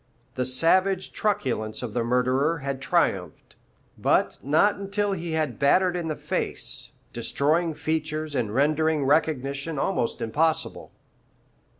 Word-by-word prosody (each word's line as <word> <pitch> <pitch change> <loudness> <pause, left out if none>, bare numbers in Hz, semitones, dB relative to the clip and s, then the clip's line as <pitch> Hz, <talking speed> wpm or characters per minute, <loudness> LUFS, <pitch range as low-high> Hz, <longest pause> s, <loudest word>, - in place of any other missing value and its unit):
The 125 - -1
savage 185 +8 +2
truculence 125 - -1
of 115 -4 -5
the 120 - 0
murderer 130 +6 +1
had 140 -2 -4
triumphed, 135 - -1 0.5
but - - +1
not 155 +9 +3
until 200 +1 -1
he 170 -3 -3
had 155 -6 -1
battered 180 +6 +3
in 175 -2 -3
the 155 - -2
face, - - -2 0.2
destroying 160 +3 +1
features 155 -1 -2
and 120 -6 -1
rendering 150 +3 +2
recognition 140 0 0
almost 135 -6 -1
impossible. 155 +8 -1
155 Hz, 120 wpm, -25 LUFS, 130-165 Hz, 0.5 s, not